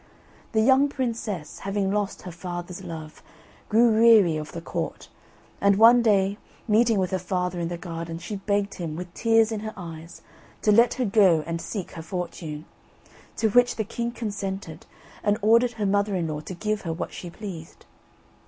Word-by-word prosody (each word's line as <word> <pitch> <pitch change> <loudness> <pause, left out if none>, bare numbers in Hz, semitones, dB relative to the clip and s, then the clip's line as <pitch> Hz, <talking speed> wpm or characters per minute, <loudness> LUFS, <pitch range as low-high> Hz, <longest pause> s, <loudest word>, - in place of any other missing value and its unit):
The 220 - +3
young 265 +3 +5
princess 230 - -4
having 195 0 -1
lost 205 -1 -2
her 180 - -7
father's 175 +1 -6
love, 160 -3 -8 0.5
grew 230 +2 +5
weary 215 -8 +6
of 155 0 -5
the 170 - -6
Court, 165 - -5 0.5
and 200 0 +5
one 230 +4 +7
day, 200 -2 +2 0.3
meeting 225 0 +3
with 185 -2 0
her 190 - 0
father 180 0 -2
in 170 - -1
the 175 0 -4
garden, 165 -1 -6
she 175 +5 -6
begged 200 0 -1
him, 165 -4 -5
with 175 +1 -7
tears 225 0 +3
in 220 - -2
her 215 +1 -6
eyes, 165 -2 -9 0.4
to 210 - +4
let 230 +3 +5
her 255 - 0
go 195 -7 +4
and 165 0 -3
seek 185 +2 -5
her 165 - -8
fortune; 165 -3 -5 0.7
to 220 - +2
which 245 +3 +4
the 220 - -1
king 235 +2 -3
consented, 195 -7 -5 0.3
and 205 0 +1
ordered 235 +3 +4
her 215 -2 -3
mother 200 0 +1
in 170 -3 -1
law 150 -1 -3
to 175 +4 -8
give 215 +3 -2
her 165 - -4
what 160 - -5
she 175 - -7
pleased. 175 -4 -9
195 Hz, 180 wpm, -25 LUFS, 170-220 Hz, 0.7 s, one